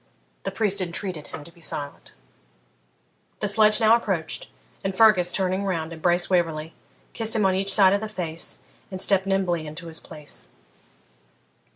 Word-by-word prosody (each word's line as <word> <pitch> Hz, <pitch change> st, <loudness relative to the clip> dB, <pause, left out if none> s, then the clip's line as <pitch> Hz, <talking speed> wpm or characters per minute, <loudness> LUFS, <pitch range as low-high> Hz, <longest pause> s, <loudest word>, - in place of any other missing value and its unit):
The -, -, 0 dB
priest 205 Hz, -3 st, +2 dB
entreated 175 Hz, -2 st, -3 dB
him 145 Hz, -, -8 dB
to 170 Hz, -, -14 dB
be 170 Hz, -, -21 dB
silent. 145 Hz, -2 st, -5 dB, 1.3 s
The 210 Hz, -, -1 dB
sledge 215 Hz, +1 st, +5 dB
now 225 Hz, 0 st, +6 dB
approached, 190 Hz, -9 st, -1 dB, 0.4 s
and 195 Hz, -1 st, -3 dB
Fergus, 190 Hz, -6 st, +5 dB
turning 190 Hz, 0 st, 0 dB
round, 165 Hz, -4 st, -2 dB
embraced 175 Hz, +2 st, +1 dB
Waverley, 165 Hz, -3 st, 0 dB, 0.4 s
kissed 225 Hz, -1 st, 0 dB
him 210 Hz, -3 st, +2 dB
on 190 Hz, -, +3 dB
each 195 Hz, +1 st, +1 dB
side 195 Hz, -2 st, +5 dB
of 200 Hz, -, +1 dB
the 220 Hz, -, -4 dB
face, 170 Hz, -6 st, -3 dB, 0.3 s
and 185 Hz, -, -6 dB
stepped 195 Hz, 0 st, +2 dB
nimbly 180 Hz, -5 st, 0 dB
into 155 Hz, +3 st, -8 dB
his 165 Hz, -1 st, -6 dB
place. 150 Hz, -, -4 dB
185 Hz, 160 wpm, -24 LUFS, 165-200 Hz, 1.3 s, now